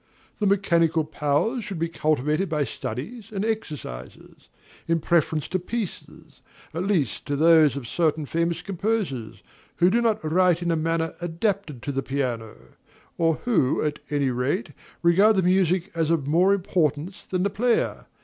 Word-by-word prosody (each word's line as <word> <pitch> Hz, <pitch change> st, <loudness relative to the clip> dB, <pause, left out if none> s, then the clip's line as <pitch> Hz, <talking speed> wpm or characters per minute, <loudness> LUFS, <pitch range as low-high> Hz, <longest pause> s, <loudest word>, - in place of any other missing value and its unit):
The 210 Hz, -, +2 dB
mechanical 170 Hz, -5 st, +2 dB
powers 150 Hz, -, 0 dB
should 195 Hz, -, -5 dB
be 165 Hz, +1 st, 0 dB
cultivated 155 Hz, +2 st, 0 dB
by 150 Hz, -3 st, +1 dB
studies 135 Hz, -, -6 dB
and 200 Hz, 0 st, -2 dB
exercises, 150 Hz, -, -6 dB, 0.4 s
in 165 Hz, 0 st, +2 dB
preference 155 Hz, -2 st, +1 dB
to 185 Hz, -, 0 dB
pieces, 210 Hz, +2 st, -6 dB, 0.3 s
at 170 Hz, +4 st, -2 dB
least 160 Hz, -, 0 dB
to 145 Hz, -, 0 dB
those 155 Hz, -2 st, +5 dB
of 135 Hz, -4 st, -5 dB
certain 155 Hz, 0 st, 0 dB
famous 170 Hz, +3 st, -1 dB
composers, 190 Hz, -, -3 dB, 0.3 s
who 175 Hz, +1 st, +4 dB
do 235 Hz, +3 st, +3 dB
not 225 Hz, -2 st, +2 dB
write 175 Hz, +2 st, +2 dB
in 170 Hz, -, 0 dB
a -, -, +2 dB
manner 165 Hz, +1 st, -1 dB
adapted 175 Hz, -, -2 dB
to 145 Hz, -, -2 dB
the 135 Hz, 0 st, -1 dB
piano; 125 Hz, -6 st, -3 dB, 0.6 s
or 165 Hz, -2 st, +2 dB
who, 215 Hz, -, +2 dB
at 150 Hz, -1 st, -2 dB
any 140 Hz, -3 st, +1 dB
rate, 140 Hz, -, -1 dB, 0.3 s
regard 195 Hz, +6 st, +5 dB
the 190 Hz, -, +2 dB
music 185 Hz, +1 st, +2 dB
as 165 Hz, -2 st, 0 dB
of 165 Hz, -5 st, +1 dB
more 175 Hz, +7 st, +3 dB
importance 175 Hz, -3 st, -1 dB
than 185 Hz, -1 st, -1 dB
the 200 Hz, -, 0 dB
player. 235 Hz, +3 st, 0 dB
165 Hz, 160 wpm, -25 LUFS, 150-190 Hz, 0.6 s, those